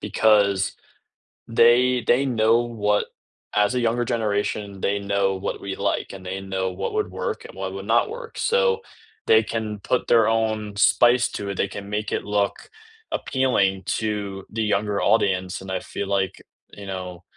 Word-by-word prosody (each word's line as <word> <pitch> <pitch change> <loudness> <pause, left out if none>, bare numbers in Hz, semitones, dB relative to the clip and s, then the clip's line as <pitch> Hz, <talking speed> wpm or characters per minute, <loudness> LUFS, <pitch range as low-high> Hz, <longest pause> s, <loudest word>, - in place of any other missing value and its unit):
because 100 -3 +2 0.7
they 120 +1 +4
they 130 +3 +4
know 115 -2 +3
what 105 -3 0 0.5
as 105 +2 +3
a - - +2
younger 120 0 +1
generation, 105 -3 -2
they 100 +1 0
know 100 -1 0
what 95 - -4
we 100 -1 -4
like - - -1
and 95 -1 -10
they 95 +1 -4
know 95 -1 -2
what 90 - -4
would 425 -1 -1
work 465 -1 -4
and - - -11
what - - -4
would - - -6
not - - +2
work. 465 0 -8
So, 475 -1 +2 0.5
they 455 -1 +6
can 110 -2 -4
put 125 +5 -1
their 115 -2 +5
own 110 -2 0
spice 120 +4 +4
to 100 -1 -5
it, 100 - -3
they 100 - +1
can 100 0 -8
make 105 0 -2
it - - -1
look 100 -1 -1 0.4
appealing 100 -8 +1
to 100 -3 -3
the 110 +1 -2
younger 105 -1 0
audience, 95 -4 +1
and 95 0 -7
I 95 - -1
feel 100 - -5
like, 95 -2 -1 0.3
you 100 - -10
know, 90 -2 -6
105 Hz, 175 wpm, -23 LUFS, 100-120 Hz, 0.7 s, they